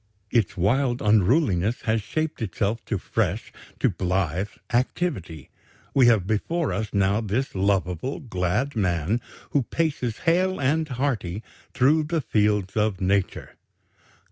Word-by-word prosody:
Its 110 Hz, -8 st, +1 dB
wild 120 Hz, +7 st, +2 dB
unruliness 105 Hz, -, +2 dB
has 110 Hz, -1 st, 0 dB
shaped 155 Hz, +7 st, -3 dB
itself 110 Hz, +2 st, -1 dB
to 110 Hz, -, -1 dB
fresh, -, -, -2 dB, 0.3 s
to -, -, +3 dB
blithe 90 Hz, 0 st, -1 dB, 0.3 s
activity; 120 Hz, -, -1 dB, 0.4 s
we 130 Hz, -3 st, +5 dB
have 110 Hz, -6 st, +4 dB
before 145 Hz, -, -1 dB
us 105 Hz, +1 st, -3 dB
now 100 Hz, +2 st, +2 dB
this 115 Hz, +5 st, -2 dB
lovable, 95 Hz, -, 0 dB
glad 115 Hz, -, -1 dB
man, 95 Hz, +2 st, 0 dB, 0.3 s
who 145 Hz, -, +3 dB
paces 130 Hz, -4 st, -1 dB
hale 185 Hz, +3 st, +2 dB
and 155 Hz, +4 st, +1 dB
hearty 120 Hz, -, -2 dB, 0.3 s
through 145 Hz, +5 st, +4 dB
the 160 Hz, +2 st, -1 dB
fields 105 Hz, -6 st, +1 dB
of 105 Hz, -3 st, +1 dB
Nature." 95 Hz, 0 st, 0 dB
110 Hz, 125 wpm, -25 LUFS, 95-135 Hz, 0.4 s, we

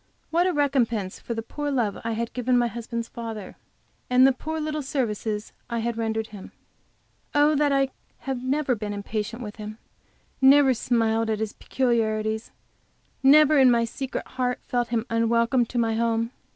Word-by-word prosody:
What 345 Hz, +3 st, +3 dB
a -, -, +2 dB
recompense 240 Hz, -, 0 dB
for 235 Hz, -, -5 dB
the 225 Hz, -, -3 dB
poor 290 Hz, +5 st, -4 dB
love 240 Hz, -7 st, 0 dB
I 230 Hz, 0 st, -2 dB
had 230 Hz, +1 st, -3 dB
given 250 Hz, 0 st, +1 dB
my 240 Hz, -, +3 dB
husband's 235 Hz, 0 st, -4 dB
father, 225 Hz, -5 st, -7 dB, 0.5 s
and 250 Hz, +1 st, +6 dB
the 270 Hz, -, +6 dB
poor 315 Hz, +5 st, -4 dB
little 305 Hz, 0 st, -2 dB
services 220 Hz, -6 st, -2 dB, 0.2 s
I 235 Hz, -, -2 dB
had 230 Hz, 0 st, -1 dB
rendered 220 Hz, -1 st, -2 dB
him! 205 Hz, -3 st, -11 dB, 0.8 s
Oh, 295 Hz, +1 st, +5 dB
that 290 Hz, 0 st, +2 dB
I 275 Hz, -1 st, +2 dB, 0.3 s
had 265 Hz, -2 st, -4 dB
never 270 Hz, 0 st, +1 dB
been 210 Hz, -2 st, -4 dB
impatient 215 Hz, +3 st, -4 dB
with 210 Hz, -1 st, -8 dB
him, 215 Hz, 0 st, -7 dB, 0.6 s
never 270 Hz, 0 st, +7 dB
smiled 225 Hz, -2 st, +1 dB
at 220 Hz, -, 0 dB
his 220 Hz, -1 st, -3 dB
peculiarities, 220 Hz, -3 st, -1 dB, 0.7 s
never 300 Hz, +2 st, +6 dB
in 260 Hz, -1 st, +7 dB
my 235 Hz, -1 st, +3 dB
secret 260 Hz, +3 st, -5 dB
heart 250 Hz, -1 st, -2 dB
felt 245 Hz, -1 st, -1 dB
him 230 Hz, -1 st, -1 dB
unwelcome 230 Hz, +2 st, +2 dB
to 245 Hz, -, -5 dB
my 225 Hz, -1 st, +2 dB
home! 230 Hz, 0 st, 0 dB
235 Hz, 170 wpm, -25 LUFS, 225-265 Hz, 0.8 s, never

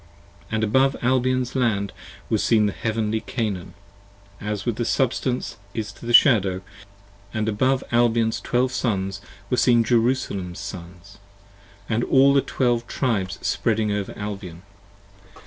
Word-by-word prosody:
71 -, -, -2 dB
AND 110 Hz, -, 0 dB
above 130 Hz, +6 st, +2 dB
Albion's 130 Hz, 0 st, +1 dB
Land 100 Hz, -6 st, 0 dB, 0.3 s
was -, -, 0 dB
seen 110 Hz, -2 st, +4 dB
the 105 Hz, -, +1 dB
Heavenly 110 Hz, +1 st, -1 dB
Canaan, 105 Hz, -8 st, -4 dB, 0.6 s
As 105 Hz, -1 st, -3 dB
the 120 Hz, -1 st, -1 dB
Substance 125 Hz, +1 st, -1 dB, 0.2 s
is 110 Hz, -2 st, -3 dB
to 115 Hz, -, -12 dB
the -, -, -1 dB
Shadow: 100 Hz, -8 st, +5 dB, 0.7 s
and 110 Hz, 0 st, -1 dB
above 130 Hz, +5 st, +1 dB
Albion's 115 Hz, -2 st, +2 dB
Twelve 125 Hz, +4 st, +1 dB
Sons 100 Hz, -6 st, -2 dB, 0.3 s
Were 125 Hz, -, +2 dB
seen 120 Hz, -2 st, +4 dB
Jerusalem's 115 Hz, -6 st, 0 dB
Sons: 95 Hz, 0 st, -9 dB, 0.7 s
and 115 Hz, +1 st, 0 dB
all 135 Hz, +1 st, +5 dB
the 140 Hz, -, +4 dB
Twelve 120 Hz, -3 st, 0 dB
Tribes 105 Hz, -8 st, -1 dB
spreading 110 Hz, -2 st, 0 dB
Over 100 Hz, -1 st, -3 dB
Albion. 100 Hz, -4 st, -6 dB
110 Hz, 130 wpm, -23 LUFS, 100-125 Hz, 0.7 s, Shadow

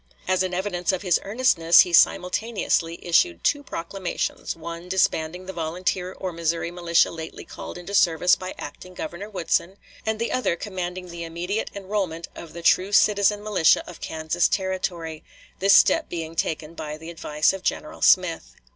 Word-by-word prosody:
As 185 Hz, 0 st, +2 dB
an 185 Hz, -1 st, 0 dB
evidence 180 Hz, -1 st, -1 dB
of 185 Hz, +1 st, -3 dB
his 180 Hz, -3 st, +3 dB
earnestness 195 Hz, -7 st, +5 dB
he 175 Hz, -, 0 dB
simultaneously 180 Hz, -2 st, +2 dB
issued 85 Hz, -, +2 dB
two 290 Hz, -, +2 dB
proclamations, 185 Hz, -6 st, -4 dB
one 170 Hz, +2 st, -8 dB
disbanding 180 Hz, -1 st, 0 dB
the 190 Hz, -, -6 dB
volunteer 180 Hz, +2 st, -2 dB
or 185 Hz, -2 st, -5 dB
Missouri 165 Hz, 0 st, -1 dB
militia 170 Hz, -1 st, +2 dB
lately 160 Hz, -1 st, -8 dB
called -, -, -8 dB
into 180 Hz, +3 st, -8 dB
service 180 Hz, -2 st, +4 dB
by 185 Hz, 0 st, -7 dB
acting 180 Hz, +5 st, -9 dB
Governor 175 Hz, +6 st, -6 dB
Woodson, 190 Hz, -1 st, -1 dB, 0.3 s
and 220 Hz, 0 st, -1 dB
the 230 Hz, +1 st, -2 dB
other 255 Hz, -9 st, +1 dB
commanding 180 Hz, -1 st, -5 dB
the 170 Hz, 0 st, -6 dB
immediate 175 Hz, +6 st, -3 dB
enrollment 190 Hz, -4 st, -3 dB
of 165 Hz, -, -10 dB
the 170 Hz, 0 st, -8 dB
true 185 Hz, +4 st, +3 dB
citizen 205 Hz, 0 st, +3 dB
militia 205 Hz, -6 st, +3 dB
of 175 Hz, -, -11 dB
Kansas 160 Hz, +2 st, 0 dB
Territory, 185 Hz, -5 st, -3 dB, 0.4 s
this 195 Hz, +1 st, +6 dB
step 325 Hz, -, +4 dB
being 165 Hz, -1 st, -5 dB
taken 160 Hz, 0 st, -2 dB
by 150 Hz, -2 st, -6 dB
the 160 Hz, +2 st, -9 dB
advice 150 Hz, -1 st, +1 dB
of 195 Hz, -, -6 dB
General -, -, -3 dB
Smith. -, -, +3 dB
175 Hz, 165 wpm, -24 LUFS, 165-190 Hz, 0.4 s, this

